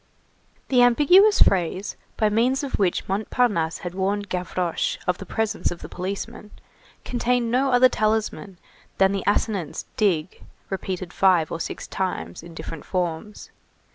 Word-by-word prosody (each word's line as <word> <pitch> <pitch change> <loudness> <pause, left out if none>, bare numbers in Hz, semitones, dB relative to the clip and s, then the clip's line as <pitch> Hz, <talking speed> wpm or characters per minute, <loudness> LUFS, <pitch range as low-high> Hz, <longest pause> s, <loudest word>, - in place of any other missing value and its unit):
The 250 -2 +4
ambiguous 330 - +6
phrase 185 +2 0 0.2
by 215 - +3
means 245 +6 +1
of 275 - -3
which 185 -3 0
Montparnasse 195 -4 0
had 175 -1 -5
warned 200 +2 -1
Gavroche 180 -1 -2
of 180 0 0
the - - -8
presence 220 -1 -1
of 175 - -8
the - - -8
policeman, 200 +4 -5 0.6
contained 245 -1 0
no 265 +3 +2
other 250 0 +6
talisman 215 -4 -1 0.4
than 195 0 +4
the 195 -1 -2
assonance 200 -6 -1
dig 185 -5 0 0.3
repeated 185 -2 -4
five 180 -5 +3
or 165 - -3
six - - -5
times 185 -1 -4
in 165 0 -12
different 165 -1 -7
forms. 180 +3 -4
200 Hz, 140 wpm, -24 LUFS, 180-230 Hz, 0.6 s, ambiguous